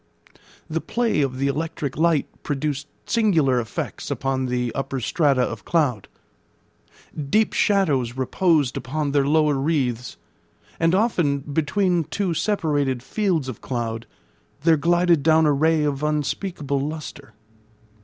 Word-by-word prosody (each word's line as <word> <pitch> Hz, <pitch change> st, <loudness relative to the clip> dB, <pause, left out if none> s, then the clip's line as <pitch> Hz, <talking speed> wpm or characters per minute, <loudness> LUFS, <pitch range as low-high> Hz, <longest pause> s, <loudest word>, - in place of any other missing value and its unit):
The 160 Hz, +1 st, -2 dB
play 235 Hz, -9 st, 0 dB
of 130 Hz, -2 st, -1 dB
the 135 Hz, -, 0 dB
electric 145 Hz, -1 st, -2 dB
light 160 Hz, -2 st, +2 dB, 0.2 s
produced 145 Hz, 0 st, -3 dB, 0.2 s
singular 165 Hz, -, +2 dB
effects 115 Hz, -, -5 dB
upon 130 Hz, -1 st, -1 dB
the 125 Hz, -1 st, -1 dB
upper 135 Hz, 0 st, -3 dB
strata 135 Hz, +1 st, +2 dB
of 115 Hz, -4 st, -4 dB
cloud. 140 Hz, -, 0 dB, 1.2 s
Deep 215 Hz, +5 st, +2 dB
shadows 140 Hz, -, +1 dB
reposed 145 Hz, 0 st, +1 dB
upon 145 Hz, +1 st, -2 dB
their 140 Hz, -1 st, +2 dB
lower 150 Hz, 0 st, +3 dB
wreaths; 135 Hz, -4 st, -1 dB, 0.6 s
and 165 Hz, +2 st, +3 dB
often, 175 Hz, -10 st, +1 dB
between 160 Hz, +4 st, 0 dB
two 180 Hz, +3 st, -2 dB
separated 145 Hz, -, 0 dB
fields 170 Hz, -2 st, 0 dB
of 130 Hz, -5 st, -7 dB
cloud, 115 Hz, -2 st, -4 dB, 0.6 s
there 165 Hz, 0 st, +5 dB
glided 170 Hz, +1 st, +3 dB
down 160 Hz, +2 st, +4 dB
a 150 Hz, -, +4 dB
ray 155 Hz, +2 st, +2 dB
of 145 Hz, -2 st, -1 dB
unspeakable 150 Hz, 0 st, -1 dB
lustre. 145 Hz, -1 st, -6 dB
150 Hz, 125 wpm, -23 LUFS, 135-165 Hz, 1.2 s, there